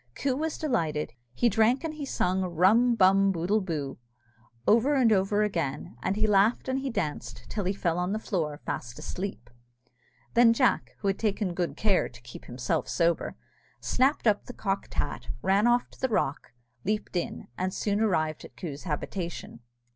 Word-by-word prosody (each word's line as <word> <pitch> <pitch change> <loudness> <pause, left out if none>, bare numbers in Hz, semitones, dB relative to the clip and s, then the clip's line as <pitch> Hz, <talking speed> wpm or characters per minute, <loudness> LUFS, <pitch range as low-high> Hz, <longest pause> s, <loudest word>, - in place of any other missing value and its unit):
Coo 275 -2 0
was 315 +2 -2
delighted: 165 - -1 0.2
he 240 - +2
drank 230 - +3
and 320 -1 -3
he 295 -2 -6
sung 185 -6 0
Rum 190 +8 +4
bum 195 -1 +5
boodle 190 +5 +1
boo 150 -9 -4 0.7
over 235 +7 +4
and 250 -4 +4
over 205 +2 +2
again; 155 - -2
and 190 +2 0
he 215 +1 +1
laughed 210 +4 +3
and 260 0 0
he 270 0 -3
danced, 155 - -4
till 205 -3 -3
he 185 - +2
fell 175 -3 -1
on 180 +1 -1
the 215 - 0
floor 160 -9 -2
fast 120 -1 -4
asleep. 190 +5 -5 0.9
Then 235 -1 +6
Jack, 255 +1 +1
who 200 - -1
had 195 - 0
taken 205 -4 0
good 175 -1 -2
care 205 -4 +2
to 120 0 -15
keep 120 - -11
himself 125 0 -2
sober, 170 -1 +1 0.4
snapt 265 +2 +1
up 210 -2 +3
the 245 - -8
cocked 195 -3 -3
hat - - -3 0.2
ran 200 +4 +3
off 240 0 +3
to - - -18
the 260 - 0
rock 150 - -1 0.3
leaped 210 0 -2
in, 175 - -3
and 185 +5 -1
soon 205 +2 -1
arrived 155 -8 +1
at 125 - -13
Coo's 150 -3 -6
habitation. 170 -3 -4
195 Hz, 175 wpm, -28 LUFS, 170-230 Hz, 0.9 s, Then